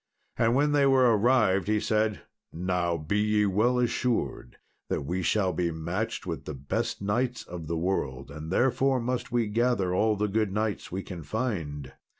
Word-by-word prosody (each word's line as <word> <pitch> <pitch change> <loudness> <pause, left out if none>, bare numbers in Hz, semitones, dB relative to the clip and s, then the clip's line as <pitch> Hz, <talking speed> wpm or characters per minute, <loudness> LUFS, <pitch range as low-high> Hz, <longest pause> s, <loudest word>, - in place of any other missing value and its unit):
And 115 +1 +2
when 145 +2 +3
they 145 -1 +4
were 130 -4 +5
arrived 105 -4 +3
he 105 0 +2
said, 105 -1 0 0.3
"Now 90 0 -1
be 85 +7 -1
ye 105 0 +2
well 110 +6 +2
assured 120 - -1 0.3
that - - -2
we 90 +5 -2
shall 95 0 +1
be 85 +1 0
matched 85 +9 -3
with 85 -3 -5
the 75 - -5
best 115 - -3
knights 120 +3 0
of 85 -5 -8
the 85 +1 -2
world, 75 -7 -2
and 75 +2 -7
therefore 130 +4 +2
must 125 +1 -3
we 120 -1 +2
gather 110 -4 +1
all 110 +3 +2
the 105 +1 0
good 105 0 0
knights 105 0 -2
we 95 +2 -3
can 90 -3 -7
find." 75 - -3
105 Hz, 175 wpm, -28 LUFS, 90-120 Hz, 0.3 s, were